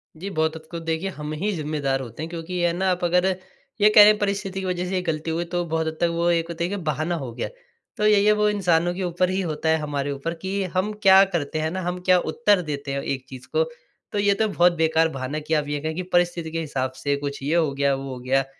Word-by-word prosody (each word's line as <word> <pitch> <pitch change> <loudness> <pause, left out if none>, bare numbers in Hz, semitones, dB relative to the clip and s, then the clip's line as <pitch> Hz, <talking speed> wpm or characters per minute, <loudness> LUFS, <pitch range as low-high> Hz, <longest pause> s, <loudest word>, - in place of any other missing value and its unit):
जी, 185 +5 -6
बहुत 160 -3 0
हद 160 0 -10
को 170 - -4
देखिए 165 +3 -2
हम 150 -4 -6
ही 190 +8 -1
ज़िम्मेदार 145 -4 -1
होते 120 +3 -7
हैं। 160 - -5
क्योंकि 165 +1 -6
ये 175 -1 +1
है 170 - 0
ना 190 +2 0
आप 180 0 -2
अगर 180 +1 +3 0.6
ये 210 - +7
कहें 210 0 +9
परिस्थिति 195 -1 -2
की 190 - -4
वज़ह 180 -1 -1
से 190 - -2
ये 185 - +1
गलती 160 -2 -2
हुई, 170 +2 -1
तो 175 +1 -2
बहुत 160 -1 -1
हद 160 0 -4
तक 170 - +4
वो 170 +1 +1
एक 165 -1 +1
होता 170 0 -3
है 175 - -1
कि 200 - -2
बहाना 155 +4 -1
हो 135 -7 -5
गया। - - -4 0.5
तो 210 - +1
यही 210 -1 +5
है 210 - +6
वो 210 0 +2
इंसानों 175 -4 +2
के 190 - -3
ऊपर 180 +1 0
ही 190 +1 0
होता 160 -2 -2
है, 160 - +4
हमारे 145 -2 -2
ऊपर 140 +4 -3
कि 195 +1 -2
हम 190 +3 +1
क्या 190 0 +8
करते 160 -5 -2
हैं 155 +1 -1
ना 185 +1 -3
हम 180 0 -3
क्या 185 -1 +6
उत्तर 205 +1 +2
देते 145 -4 -4
हैं 140 - -2
एक 135 -2 -3
चीज़ 130 -1 -10
को? 485 - +4 0.5
तो, 205 - -1
ये 200 0 +4
तो 220 +2 +1
बहुत 175 -3 +3
बेकार 160 0 +2
बहाना 130 +4 -3
कि 155 +1 -4
आप 150 -2 +1
ये 145 0 -2
कहें 160 +1 -3
कि 185 - -3
परिस्थिति 175 -2 +1
के 165 - -2
हिसाब 135 -5 -2
से 145 +1 -1
कुछ 140 0 -4
ये 150 +4 0
हो 160 -4 +2
गया, 140 0 +1
वो 135 0 -6
हो 125 - -7
गया। 130 +2 +1
165 Hz, 275 wpm, -24 LUFS, 150-185 Hz, 0.6 s, कहें